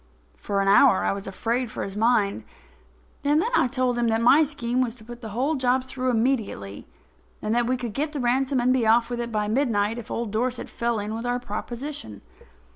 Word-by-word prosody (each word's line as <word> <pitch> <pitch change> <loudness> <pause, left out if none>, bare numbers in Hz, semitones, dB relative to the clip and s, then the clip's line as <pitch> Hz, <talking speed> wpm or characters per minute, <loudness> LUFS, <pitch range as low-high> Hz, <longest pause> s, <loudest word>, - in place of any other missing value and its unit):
For 200 -1 -2
an 195 - 0
hour 205 +2 +6
I - - +1
was 195 0 -5
afraid 230 +5 -2
for - - -5
his 195 - -6
mind. 215 -2 +2 0.8
And 295 +2 +3
then 450 +8 0
I - - +4
told 250 -1 0
him 235 - +2
that 225 0 +2
my 270 +7 +6
scheme 255 -4 -1
was 240 -2 -1
to 230 - -14
put 240 +2 -10
the 220 - -6
whole 255 +9 0
job 255 -2 +1
through 255 0 -3
immediately 220 - -1 0.5
and 215 - -2
that 240 0 +2
we 255 - +1
would 240 -4 -5
get 295 +5 -1
the 295 - -4
ransom 260 +2 +1
and 250 +1 +3
be 245 -4 +1
off 230 +2 +3
with 240 - -2
it 235 0 -3
by 210 -1 -1
midnight 225 -2 +1
if 235 - -10
old 230 -3 -3
Dorset 245 +3 -2
fell 235 -1 -1
in 210 +1 -3
with 230 +2 -4
our 245 0 0
proposition. 240 - -6
240 Hz, 220 wpm, -25 LUFS, 220-255 Hz, 0.8 s, hour